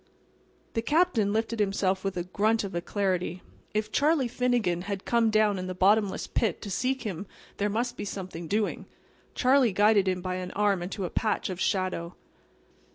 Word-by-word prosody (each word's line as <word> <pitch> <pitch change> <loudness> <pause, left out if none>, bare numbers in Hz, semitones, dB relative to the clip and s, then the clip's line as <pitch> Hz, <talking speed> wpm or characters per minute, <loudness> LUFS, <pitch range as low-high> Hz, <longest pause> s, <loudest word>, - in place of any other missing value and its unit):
The 225 - 0
Captain 290 - +2
lifted 225 +1 -1
himself 195 -2 +1
with 195 -1 -2
a 175 - -1
grunt 215 +5 +1
of 200 - -5
alacrity. 180 0 -1 0.3
If 215 0 -2
Charlie 290 -2 +2
Finnegan 240 -8 0
had 195 -1 -3
come 235 -1 +3
down 215 -2 +3
in 185 - -4
the 185 - -4
bottomless 200 +2 +3
pit 215 -8 -1
to 200 - -6
seek 260 +6 -1
him 195 -3 -5 0.3
there 205 +1 0
must 240 +3 -2
be - - -4
something 185 -4 -6
doing. 210 +3 -1 0.5
Charlie 255 -2 +4
guided 205 0 +4
him 185 -1 0
by 185 -1 -2
an 180 0 -5
arm 205 -3 +2
into 190 +2 -4
a - - -5
patch 215 -3 0
of 185 0 -5
shadow. 185 -3 -1
205 Hz, 175 wpm, -28 LUFS, 185-225 Hz, 0.5 s, Charlie